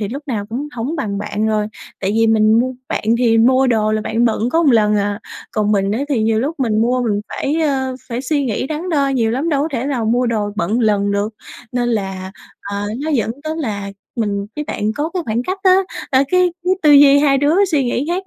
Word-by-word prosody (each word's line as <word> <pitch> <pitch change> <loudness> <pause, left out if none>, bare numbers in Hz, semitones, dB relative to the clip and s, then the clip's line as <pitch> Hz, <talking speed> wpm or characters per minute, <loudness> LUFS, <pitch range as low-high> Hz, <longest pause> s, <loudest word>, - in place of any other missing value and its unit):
thì 205 - -2
lúc 275 +7 -6
nào 210 -5 -2
cũng 270 +6 -4
hổng 255 +8 -3
bằng 205 -8 -3
bạn 210 +1 -2
rồi, 215 -1 0 0.3
tại 195 0 -1
vì 225 0 +3
mình 215 -1 +4
mua 255 +1 -1 0.2
bạn - - -3
thì 230 -2 +3
mua 255 +3 +4
đồ 215 -3 +1
là 215 - 0
bạn 225 +2 0
bận 230 0 +1
có 330 +4 +2
một 285 - +4
ần 210 -1 +3
à, 205 0 -1 0.3
còn 210 -1 0
mình 195 -1 +1
á 225 - -1
thì 260 -7 +1
nhiều 220 0 +2
lúc 290 +3 -3
mình 220 -3 +1
mua 250 +2 +1
mình 210 -4 0
phải, 285 +3 -2
ơ, 265 -4 0
phải 240 0 -3
suy 285 +1 0
nghĩ 245 +1 -2
đắn 315 +5 -4
đo 285 -5 +1
nhiều 235 -5 +1
lắm, 275 +8 -1
đâu 285 -3 +1
có 315 - -1
thể 255 +1 -2
nào 250 -6 -1
mua 245 +3 +1
đồ 215 -3 -1
bận 205 +3 -1
một 245 - +1
lần 205 -2 +2
được. 205 +2 -1 0.4
Nên 245 -1 0
là, 195 -4 -3 0.3
ờ, 200 0 -4 0.2
nó 315 - -1
dẫn 230 -6 0
tới 315 +1 -4
là 205 -8 -3 0.3
mình 200 -3 -1
với 300 - -3
bạn 215 -5 -2
có 300 +6 -3
cái 360 - -1
khoảng 230 +2 -1
cách 375 +8 -3
á, 370 -1 +6 0.3
ơ, 260 - +4
cái 365 -1 +3
cái 370 +1 +3
tư 305 - +5
duy 285 0 +7
hai 280 -2 +3
đứa 290 +4 +2 0.2
suy 285 -4 +2
nghĩ 245 +2 -1
khác 370 +2 -2
240 Hz, 250 wpm, -18 LUFS, 215-280 Hz, 0.4 s, duy